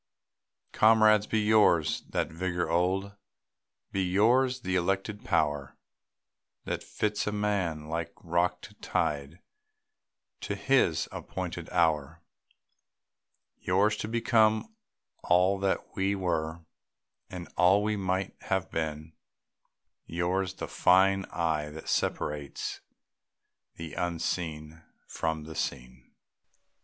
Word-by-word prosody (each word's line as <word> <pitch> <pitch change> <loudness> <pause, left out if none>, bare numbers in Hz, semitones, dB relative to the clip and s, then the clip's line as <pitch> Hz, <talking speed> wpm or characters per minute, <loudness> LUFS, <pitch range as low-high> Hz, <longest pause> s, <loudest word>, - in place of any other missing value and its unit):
Comrades, 110 -1 +5
be 110 - +1
yours 105 -7 +3
that - - -1
vigor 90 +1 -2
old, 95 +3 0 0.8
Be 95 - 0
yours 120 +8 +3
the 95 -2 -2
elected 95 +4 -1
power 75 - 0 0.9
That - - -3
fits 105 -1 -2
a - - +1
man, 95 -7 -1
like 80 0 -3
rock 85 +1 0
to - - -11
tide, 75 +3 -2 1.0
To - - -3
his 85 -13 +2
appointed - - -6
hour; 80 -2 +1 1.4
Yours 100 +4 +2
to 105 - -4
become 115 - +2 0.5
all 90 +3 +3
that 95 -1 -2
we 95 +1 +1
were, 85 -3 -2 0.6
And 90 -1 -7
all 95 +4 +4
we 105 0 0
might 95 -1 -2
have 95 -1 -1
been; 80 0 -3 0.9
Yours 90 +2 -1
the - - -5
fine 95 +1 +4
eye 80 -3 -1
that 80 +1 -10
separates 75 -2 -2 0.9
The 80 -1 -8
unseen 80 -2 -3 0.2
from 80 -1 -3
the 80 +1 -8
seen. 65 -3 -5
90 Hz, 105 wpm, -29 LUFS, 80-100 Hz, 1.4 s, Comrades